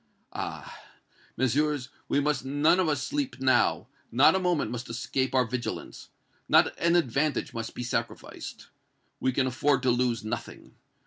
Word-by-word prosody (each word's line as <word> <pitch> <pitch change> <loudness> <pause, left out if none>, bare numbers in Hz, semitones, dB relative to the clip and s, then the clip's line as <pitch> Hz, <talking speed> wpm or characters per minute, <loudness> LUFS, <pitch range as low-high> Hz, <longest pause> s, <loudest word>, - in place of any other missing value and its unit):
Ah! - - -6 0.6
Messieurs, 130 +1 +1 0.2
we - - +2
must 145 -2 0
none 145 +6 +3
of 180 -4 +2
us 145 -3 0
sleep 140 -4 -3
now! 130 -2 +2 0.3
Not 130 +5 +6
a 190 - +2
moment 180 -8 0
must 120 0 -5
escape 130 +3 -2
our 130 -1 +4
vigilance! 120 +1 -5 0.4
Not - - +5
an 170 +1 +3
advantage 150 -2 0
must 115 -1 -5
be 125 - -4
sacrificed! 120 - -5 0.5
We 130 - +1
can 130 +1 +1
afford 130 +1 +1
to 130 - +4
lose 120 -2 0
nothing! 110 - -6
130 Hz, 150 wpm, -28 LUFS, 125-145 Hz, 0.6 s, Not